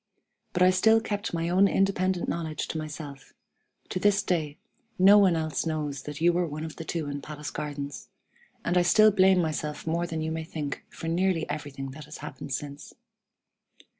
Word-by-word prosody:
But 180 - +3
I 185 - +7
still 220 +4 +5
kept 210 -1 -3
my 165 0 -1
own 185 +3 +5
independent 190 -2 +1
knowledge 160 -3 -3
to - - -3
myself; 150 -3 -8 0.6
to 185 - -2
this 205 +1 +3
day, 155 -6 -1 0.4
no 195 +3 +8
one 190 -4 +5
else 155 -3 -1
knows 150 -4 -2
that 150 +1 -7
you 170 +2 +4
were 175 0 +1
one 155 +1 -5
of 160 - -8
the - - -5
two 160 -2 -3
in 145 0 -4
Palace 150 0 -7
Gardens; 145 -2 -5 0.6
and 175 +1 +3
I - - +4
still 215 +5 +6
blame 190 -1 +5
myself 150 -1 -3
more 170 +2 0
than 160 -1 -3
you 160 - -2
may 160 0 -3
think 150 -3 -5
for 165 - -7
nearly 170 0 +1
everything 140 -2 -5
that 150 +2 -10
has 150 +1 -9
happened 145 -2 -8
since. 140 +2 -6
160 Hz, 190 wpm, -27 LUFS, 150-185 Hz, 0.6 s, no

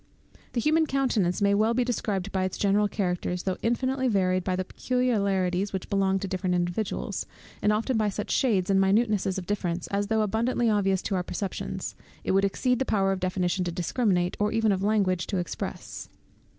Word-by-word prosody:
The 240 - 0
human 315 +5 +3
countenance 220 -10 +1
may 200 - +4
be 200 - +3
well 225 +2 +2
described 215 -6 -1
by 190 -1 0
its 185 - -2
general 205 +1 +3
characters, 180 -3 -2
though 190 -1 -2
infinitely 260 +3 0
varied 185 -4 +2
by 185 0 0
the 185 0 -2
peculiarities 200 -7 0
which 190 +2 -4
belong 195 -1 +2
to 195 - -3
different 185 -1 -1
individuals, 175 +4 -2 0.3
and 210 - +3
often 225 +4 0
by 215 -1 +2
such 205 +1 -4
shades 200 -8 +2
and 195 0 +4
minutenesses 200 -1 +2
of 185 - -4
difference, 180 -3 -2
as 200 0 -1
though 220 0 +2
abundantly 230 +3 +1
obvious 195 -3 +1
to - - -2
our 185 - +1
perceptions, 185 +2 -4 0.3
it - - 0
would 195 +1 +3
exceed 250 +5 +1
the - - +2
power 195 -6 +1
of 190 - -1
definition 185 0 0
to 175 - -2
discriminate, 180 0 0
or 210 0 +1
even 225 -1 +2
of 190 -1 0
language 195 -4 +1
to 195 - -1
express. 175 -1 -5
200 Hz, 190 wpm, -27 LUFS, 185-220 Hz, 0.3 s, may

